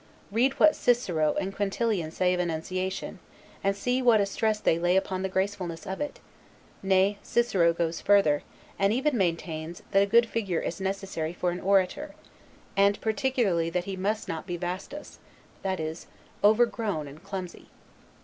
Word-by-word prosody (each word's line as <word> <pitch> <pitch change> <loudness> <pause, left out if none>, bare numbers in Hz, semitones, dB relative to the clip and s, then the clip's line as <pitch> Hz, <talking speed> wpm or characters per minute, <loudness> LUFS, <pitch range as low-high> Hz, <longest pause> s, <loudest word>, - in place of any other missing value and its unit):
Read 245 +6 +2
what 310 - +5
Cicero 175 -11 +1
and 195 0 -4
Quintilian 205 -4 0
say 180 +2 +1
of 180 - -1
enunciation, 185 +3 -3 0.4
and 195 0 +2
see 250 +6 0
what 235 -4 +5
a 200 - +3
stress 215 +2 0
they 165 - +2
lay 175 +1 +2
upon 190 -1 -1
the 190 - -1
gracefulness 190 -3 -2
of 190 - -5
it; 295 - -4 0.6
nay, 195 +1 +2
Cicero 195 -8 +2
goes 165 -1 -2
further, 195 -8 +4 0.4
and 195 0 +3
even 265 +5 +1
maintains, 170 -3 -2
that 195 - +5
a 200 - +3
good 235 +3 +5
figure 200 -7 -2
is 170 +3 -4
necessary 190 -4 -3
for 175 0 -1
an 175 - -4
orator; 195 - +1 0.6
and 200 +1 +3
particularly 220 - +1
that 175 +1 -1
he 195 +1 -5
must 205 +4 -2
not 165 +3 -5
be 175 -1 -3
vastus, 185 - -6 0.4
that 190 -2 -2
is, 160 +1 -5 0.4
overgrown 215 -7 +2
and 145 +5 -12
clumsy. 190 -3 -7
190 Hz, 160 wpm, -27 LUFS, 175-210 Hz, 0.6 s, what